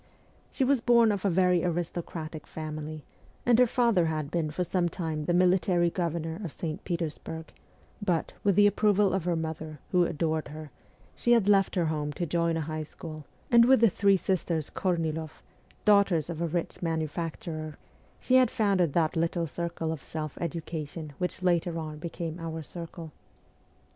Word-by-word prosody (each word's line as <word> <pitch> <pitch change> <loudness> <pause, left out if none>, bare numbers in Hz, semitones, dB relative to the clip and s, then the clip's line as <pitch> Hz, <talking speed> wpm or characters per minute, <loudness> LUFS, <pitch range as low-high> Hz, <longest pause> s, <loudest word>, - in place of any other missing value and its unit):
She 270 - -1
was 265 -1 +3
born 235 -2 +5
of 200 -1 -2
a - - +4
very 180 -1 +3
aristocratic 170 -2 -4
family, 155 -1 -6 0.4
and 240 -1 +5
her 250 - +6
father 230 -8 +3
had 155 -2 -2
been 165 -3 0
for 170 +4 -2
some 175 -1 0
time 160 -4 -3
the - - 0
military 180 -1 +3
governor 165 0 -2
of 170 - -4
St. 155 0 -5
Petersburg; 160 -2 -4 0.5
but, 175 -5 0
with 200 -3 +3
the 205 - +6
ap 205 -1 +3
proval 205 -2 +3
of 185 -3 -2
her 175 -1 +1
mother, 160 -1 -4
who 180 -1 +4
adored 160 -1 -1
her, 155 0 -9 0.4
she 240 - +3
had 225 -4 +3
left 195 -1 +4
her 175 -3 +2
home 150 -2 -1
to 175 - -2
join 170 0 +1
a - - -1
high 155 +1 -3
school, 155 0 -9 0.3
and 235 -1 +7
with 265 0 +6
the 230 -3 +5
three 200 +2 +4
sisters 170 -4 -1
Korniloff 160 -4 -2 0.4
daughters 195 -6 +4
of 165 0 -5
a 170 - +1
rich 170 +1 -3
manufacturer 160 -1 -3 0.4
she 255 - +4
had 255 -2 +5
founded 195 -9 +1
that 165 0 +2
little 170 +1 0
circle 165 0 -3
of 160 -4 -5
self 155 -2 -5
education 160 -2 -5
which 180 0 -2
later 175 -1 +1
on 155 -2 -5
became 170 0 -5
our 160 -1 -5
circle. 165 0 -8
170 Hz, 175 wpm, -28 LUFS, 160-185 Hz, 0.5 s, and